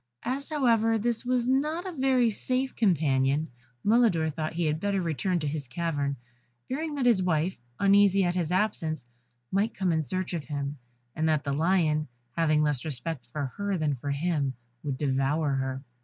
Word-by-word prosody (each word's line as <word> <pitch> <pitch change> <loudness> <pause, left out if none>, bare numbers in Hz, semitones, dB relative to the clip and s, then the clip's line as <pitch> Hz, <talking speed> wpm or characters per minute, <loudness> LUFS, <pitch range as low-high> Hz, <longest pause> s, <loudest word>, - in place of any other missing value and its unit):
As, 270 +4 -3
however, 230 -7 +3
this 230 +1 -1
was 250 -1 +1
not 300 +7 +1
a 375 - -3
very 260 -6 +2
safe 255 +5 -1
companion, 150 - +2 0.3
Mulidor 205 -8 +3
thought 155 0 -3
he 170 0 0
had 155 0 0
better 200 +1 0
return 175 +2 0
to 150 -3 -2
his 145 -2 -3
cavern, 145 -1 -1 0.5
fearing 300 +3 -3
that 275 -3 0
his 230 -6 +5
wife, 175 0 +1 0.2
uneasy 200 -1 +5
at 175 -1 +1
his 175 -2 -1
absence, 175 - 0 0.5
might 200 +4 +1
come 190 -2 +1
in 160 -1 +2
search 185 +4 -3
of 160 -5 -3
him, 145 -1 -4 0.4
and 160 0 +1
that 155 -2 +2
the 140 - -1
lion, 155 -1 +2 0.3
having 155 -2 +3
less 145 -4 +1
respect 145 -2 -4
for 145 +4 -3
her 200 -1 -1
than 155 -3 +1
for 140 +2 -5
him, 140 -2 0 0.3
would 140 -3 -3
devour 140 +2 +1
her. 130 0 -2
165 Hz, 175 wpm, -28 LUFS, 150-215 Hz, 0.5 s, his